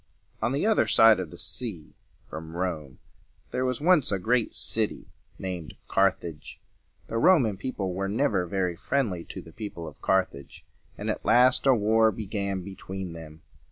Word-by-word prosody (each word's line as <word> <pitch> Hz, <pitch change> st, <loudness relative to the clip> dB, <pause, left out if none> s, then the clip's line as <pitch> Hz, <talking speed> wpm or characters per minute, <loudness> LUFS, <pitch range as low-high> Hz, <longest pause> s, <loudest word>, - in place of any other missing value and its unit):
On 110 Hz, +2 st, +1 dB
the 140 Hz, +7 st, 0 dB
other 215 Hz, -, +3 dB
side 110 Hz, -2 st, +6 dB
of 90 Hz, -4 st, -4 dB
the -, -, -11 dB
sea 100 Hz, -11 st, -4 dB, 0.3 s
from 80 Hz, +1 st, -8 dB
Rome 80 Hz, -7 st, -3 dB, 0.5 s
there 125 Hz, -, -1 dB
was 125 Hz, -2 st, -1 dB
once 165 Hz, -5 st, +4 dB
a 100 Hz, -, +1 dB
great 115 Hz, +4 st, +1 dB
city 110 Hz, -2 st, -2 dB, 0.3 s
named 90 Hz, -5 st, -5 dB
Car 95 Hz, 0 st, +4 dB
thage. 80 Hz, -4 st, -10 dB, 0.5 s
The 115 Hz, -, -2 dB
Roman 125 Hz, -, +4 dB
people 95 Hz, -3 st, -3 dB
were 95 Hz, +1 st, -2 dB
never 105 Hz, -5 st, +1 dB
very 90 Hz, -1 st, -1 dB
friendly 105 Hz, -5 st, -1 dB
to -, -, -8 dB
the 80 Hz, -, -14 dB
people 100 Hz, -6 st, -6 dB
of -, -, -12 dB
Car 95 Hz, -1 st, +3 dB
thage, 70 Hz, -6 st, -13 dB, 0.3 s
and -, -, -5 dB
at -, -, -5 dB
last 125 Hz, +2 st, +4 dB
a 135 Hz, -, +7 dB
war 110 Hz, +1 st, +4 dB
began 100 Hz, -3 st, -3 dB
between 95 Hz, -1 st, -7 dB
them. 80 Hz, -1 st, -11 dB
100 Hz, 170 wpm, -27 LUFS, 90-115 Hz, 0.5 s, a